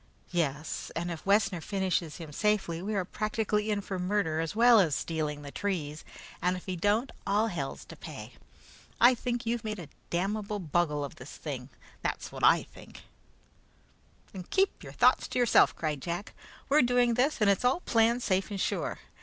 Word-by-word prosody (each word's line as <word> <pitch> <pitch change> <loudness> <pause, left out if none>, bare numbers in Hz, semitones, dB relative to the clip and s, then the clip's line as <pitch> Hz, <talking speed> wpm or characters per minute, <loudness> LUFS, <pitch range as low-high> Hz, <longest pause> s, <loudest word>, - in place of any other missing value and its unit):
"Yes, 155 -3 -2
and 175 +1 -2
if 165 +2 -7
Wessner 195 -3 +3
finishes 185 -4 -1
him 160 -3 -9
safely, 195 -3 0
we 210 +3 -3
are 190 -2 0
practically 215 0 -1
in 205 -1 0
for 190 -2 -5
murder 180 -4 0
as 165 +4 -2
well 235 0 +7
as 160 -8 +3
stealing 150 -3 -3
the 140 - -8
trees; 155 -7 -3 0.4
and 180 +1 +1
if 180 - -11
he 185 - -3
don't, 205 +8 +1 0.2
all 210 +3 +2
hell's 145 -8 -4
to - - -11
pay. - - -9 0.7
I 245 +2 +8
think 240 0 -3
you've 235 0 -1
made 215 -1 -3
a 170 -6 -9 0.2
damnable 205 +4 -1
bungle 160 -4 0
of 140 - -10
this 125 +3 -10
thing; 135 -4 -6 0.3
that's - - -3
what - - -8
I - - +6
think!" - - -14 1.3
"Then 190 - -6
keep 390 +1 +1
your - - -10
thoughts - - +4
to - - -4
yourself," 245 -2 +5
cried 150 -4 -2
Jack. 175 +5 -4 0.3
"We're 295 +2 +5
doing 245 -1 +3
this, 255 +5 +1
and 210 - +3
it's 200 +2 +3
all 255 +8 +2
planned 235 -1 +2
safe 190 +1 +1
and 200 -2 -4
sure. - - -1
195 Hz, 185 wpm, -29 LUFS, 165-220 Hz, 1.3 s, I